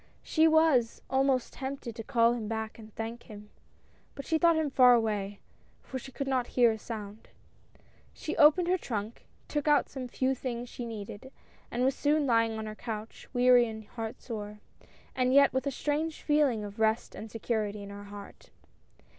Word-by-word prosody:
She 320 0 +3
was 315 -7 +3
almost 265 -1 +1
tempted 265 -4 -6
to 225 - -6
call 230 +1 +3
him 230 -3 -4
back 220 0 -4
and 220 -1 -12
thank 225 +1 -5
him, 210 -1 -11 0.6
but 275 - -7
she 320 -1 +1
thought 335 0 +5
him 315 -3 0
far 250 -2 +7
away, 205 -3 -1 0.4
for 260 - -6
she 265 - -11
could 275 +1 -4
not 255 -2 0
hear 240 -2 +6
a 220 - -5
sound. 210 -1 -8 0.8
She 315 - -5
opened 325 +4 +6
her 365 +1 +2
trunk, 220 -4 -5 0.2
took 295 0 -2
out 295 -1 +4
some 260 -2 -6
few 260 +2 0
things 245 -2 -5
she 240 - -6
needed, 215 +3 -8 0.4
and 245 +1 -1
was 265 - +3
soon 295 +2 +1
lying 230 -3 +2
on 220 - -4
her 215 - -5
couch, 220 0 -7
weary 245 -1 +5
and 220 -1 -8
heart 225 -1 -6
sore, 210 -3 -6 0.6
and 255 0 +2
yet 280 0 +6
with 260 +1 -1
a - - 0
strange 305 +4 -2
feeling 290 -8 +2
of 205 +1 -8
rest 220 +1 +1
and 220 - -8
security 215 -2 -2
in 200 - -9
her 205 0 -9
heart. 205 - -11
240 Hz, 185 wpm, -29 LUFS, 220-275 Hz, 0.8 s, far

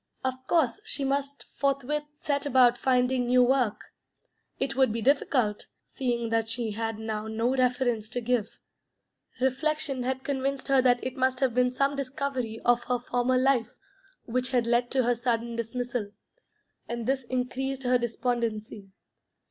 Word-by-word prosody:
Of 260 0 -3
course 325 - +2
she 295 -9 -2
must 280 +1 -1 0.2
forthwith 280 +2 0
set 285 -1 -1
about 250 -3 +5
finding 250 0 +1
new 250 0 +5
work. 245 -4 +2 0.8
It 270 0 -1
would 265 -3 +3
be 230 - -2
difficult, 255 -5 +1 0.2
seeing 235 -3 -2
that 225 -1 +1
she 230 -1 -2
had 225 +1 -3
now 220 -1 -4
no 225 +4 0
reference 245 -4 +1
to 245 - -2
give. 235 -2 -1 0.8
Reflection 270 +1 0
had 260 +1 -2
convinced 275 -1 -2
her 270 -1 +5
that 245 -1 +3
it 255 +1 -4
must 260 0 +1
have 260 -3 +1
been 250 +1 +3
some 275 +3 0
discovery 260 -4 -3
of 240 0 +3
her 250 - +1
former 245 +1 0
life 260 -2 +2 0.5
which 250 +2 -1
had 245 -3 +1
led 240 +1 +2
to 260 -1 +2
her 245 +1 +3
sudden 235 -1 -1
dismissal, 235 -1 -3 0.8
and 235 -1 -3
this 265 +1 0
increased 260 +2 -2
her 250 0 +3
despondency. 230 -4 -2
250 Hz, 155 wpm, -28 LUFS, 235-265 Hz, 0.8 s, about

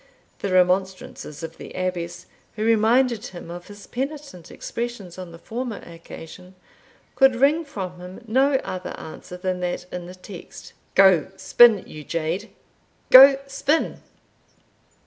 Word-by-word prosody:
The 200 - -3
remonstrances 185 -4 0
of 165 0 -7
the - - -10
Abbess, 180 -2 -4 0.3
who 215 - -2
reminded 230 +1 +3
him 175 -2 -10
of 175 0 -9
his 205 0 -12
penitent 275 - -6
expressions 230 -7 -6
on 180 -2 -8
the 165 - -11
former 235 +5 -5
occasion, 170 +2 -12 0.6
could 270 -2 +5
wring 285 +6 +3
from 185 - -7
him 180 +6 -11
no 265 +5 +3
other 185 0 -6
answer 180 +3 -9
than 185 0 -2
that 180 0 -3
in 180 -1 -5
the 180 - -10
text 185 -1 -11 0.2
"Go 190 -5 +6
spin, 230 -5 +5
you 155 -1 -10
jade! 165 +7 -3 0.6
Go 270 +1 +10
spin!" 275 +3 -1
190 Hz, 135 wpm, -23 LUFS, 180-240 Hz, 0.6 s, Go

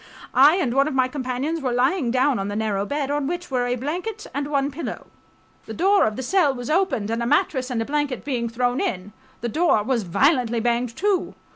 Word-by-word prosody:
I 285 +6 +6
and 320 -11 0
one 275 +2 +3
of 305 - -3
my 260 -1 +3
companions 265 +4 -3
were 255 -2 -1
lying 255 +3 +1
down 255 +1 +2
on 195 - -2
the 205 - -4
narrow 205 -2 -1
bed, 285 -1 -2
on 290 -1 -1
which 350 0 -4
were 250 -1 0
a 245 - 0
blanket 360 - -4
and 285 +1 -2
one 280 -1 0
pillow. 305 +5 -6 0.6
The - - -6
door 395 +3 +4
of 215 -1 -1
the 260 - -5
cell 295 -2 +2
was 245 +2 -5
opened 315 - +1
and 230 +1 -1
a 235 - -1
mattress 280 -3 +1
and 245 -3 -2
a - - -8
blanket 290 -2 -2
being 240 -5 -2
thrown 245 +2 0
in, 185 +2 -3 0.3
the 240 - -2
door 315 -6 +2
was 245 0 0
violently 240 - +2
banged 235 0 -1
to 395 -2 0
260 Hz, 225 wpm, -23 LUFS, 240-300 Hz, 0.6 s, I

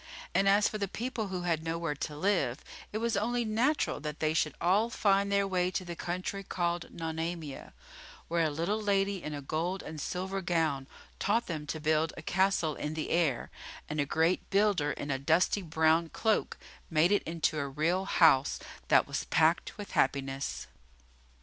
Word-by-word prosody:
And 195 0 +4
as 205 +1 +5
for 215 - -4
the 200 - -1
people 230 +1 -3
who 185 -2 -4
had 165 -3 0
nowhere 165 -1 -2
to 145 +1 -5
live, 175 -8 0 0.3
it 215 - -2
was 230 0 0
only 240 +3 0
natural 240 +8 +1
that 150 0 -5
they 155 0 +1
should 155 -1 0
all 200 +6 +3
find 200 -4 +2
their 200 0 +3
way 180 -2 +1
to 185 0 -3
the 170 -1 -5
country 185 +4 -4
called 175 -2 -2
Nonamia, 160 -2 -5 0.6
where 170 0 +1
a 160 - +2
little 170 +9 -1
lady 200 -2 +1
in 150 -2 -5
a 145 - -6
gold 170 +7 -2
and 155 -2 -7
silver 190 +4 -3
gown 160 -6 0 0.3
taught 230 +4 +1
them 155 -3 -5
to 155 - -3
build 155 +1 +1
a 160 - -8
castle 185 -3 +1
in 150 +2 -4
the 155 - -3
air, 160 -7 +1 0.4
and 150 0 -3
a - - 0
great 165 +4 +1
builder 195 -7 +2
in 145 +1 -4
a 135 - -1
dusty 165 +8 +2
brown 160 0 +2
cloak 220 +4 0 0.3
made 165 +3 +3
it 205 - +4
into 160 -2 -1
a 140 -1 -2
real 170 +7 0
house 150 -8 +4 0.3
that - - +5
was - - -3
packed 160 +2 +2
with 205 -1 -7
happiness. 135 0 0
170 Hz, 180 wpm, -30 LUFS, 155-195 Hz, 0.6 s, as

